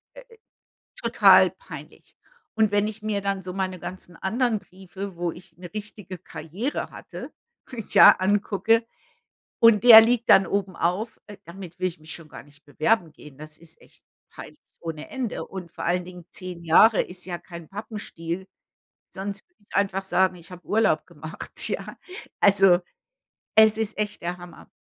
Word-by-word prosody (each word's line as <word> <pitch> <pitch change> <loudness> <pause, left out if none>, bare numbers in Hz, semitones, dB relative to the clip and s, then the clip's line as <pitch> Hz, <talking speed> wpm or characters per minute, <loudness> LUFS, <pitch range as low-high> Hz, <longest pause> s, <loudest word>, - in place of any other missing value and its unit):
äh, - - -11 0.7
total - - +5
peinlich. - - -13 0.4
Und 220 -2 +2
wenn 205 0 +1
ich 215 0 -7
mir 215 -2 -2
dann 195 -1 -2
so 180 0 -6
meine 185 -1 -3
ganzen 175 0 -9
anderen 230 +4 0
Briefe, 190 0 -10
wo 175 0 -2
ich 175 +1 -15
'ne 175 0 -11
richtige 210 -3 -8
Karriere 185 - -5
hatte, - - -10 0.6
ja - - +9
angucke 205 +3 +1 0.8
und 230 -3 +5
der 230 -2 +11
liegt 235 +1 +1
dann 195 - +6
obenauf, 195 +2 -2
äh, 205 -2 -11
damit 180 +1 -11
will 185 - +1
ich 170 -3 -8
mich 155 +1 -10
schon 165 -2 -11
gar 135 - -11
nicht 145 0 -22
bewerben 160 - 0
gehen. 150 -2 -15
Das 155 0 -10
ist 165 -1 -15
echt - - -22 0.2
peinlich - - -12 0.2
ohne 160 -2 -7
Ende. 255 -4 -4
Und 180 -3 -9
vor - - -8
allen 180 +1 0
Dingen 180 -1 -12
10 180 -2 -9
Jahre 190 +6 +5
ist 180 0 -8
ja 175 -2 -4
kein 170 -1 -11
Pappenstiel. 190 -4 -6 0.6
Sonst 200 +1 -7
würde 355 -11 -38
ich - - -16
einfach 195 -1 0
sagen, 190 -1 +2
ich 170 0 -14
habe 180 -1 -12
Urlaub 220 +2 +1
gemacht, - - -4
ja. - - -5 0.4
Also, 195 -3 +5 0.8
es 220 0 +6
ist 220 -1 -3
echt 210 0 -3
der 175 +1 -4
Hammer. 175 -1 -13
190 Hz, 165 wpm, -24 LUFS, 175-210 Hz, 0.8 s, der